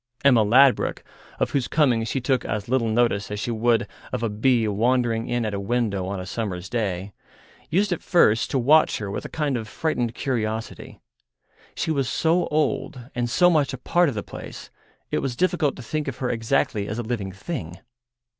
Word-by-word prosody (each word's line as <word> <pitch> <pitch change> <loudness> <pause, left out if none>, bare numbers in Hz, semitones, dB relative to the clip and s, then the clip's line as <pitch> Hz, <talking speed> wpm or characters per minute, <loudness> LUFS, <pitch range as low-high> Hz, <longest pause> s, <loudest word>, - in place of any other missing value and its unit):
Emma 125 -5 +6
Ladbruk, 130 +5 +4 0.4
of - - 0
whose 135 -3 0
coming 130 -8 +2
she 135 - -1
took 130 0 0
as 105 -2 -3
little 125 -1 +1
notice 110 -3 +1
as 105 0 -4
she 120 - -2
would 115 0 +2 0.3
of - - -3
a 115 - +1
bee 115 +2 +2
wandering 115 +2 +1
in 120 -1 -1
at 105 - -2
a 100 - -2
window 100 -3 -1
on 100 0 -3
a 90 - -6
summer's 95 -3 -4
day, 100 -5 -2 0.6
used 195 +4 +1
at 175 - -1
first 115 -10 +3
to - - 0
watch 145 +6 +4
her 100 -2 -5
with - - -5
a - - -6
kind 150 -4 -1
of 115 -3 -4
frightened 120 -3 -2
curiosity. 115 -5 -3 0.8
She 160 - -1
was 135 -5 0
so 165 +5 +1
old 140 -4 -2
and 120 -1 -1
so 175 +8 +4
much 145 -4 +2
a - - -4
part 170 +6 +2
of 130 - -5
the 105 - -3
place, - - -9 0.4
it - - +1
was 130 -3 -3
difficult 175 -2 +1
to 130 - -9
think 150 +5 -3
of 135 -2 -4
her 125 - -1
exactly 110 -3 0
as 105 - -4
a 120 - -2
living 110 -4 -3
thing. 95 - -6
120 Hz, 200 wpm, -24 LUFS, 110-140 Hz, 0.8 s, Emma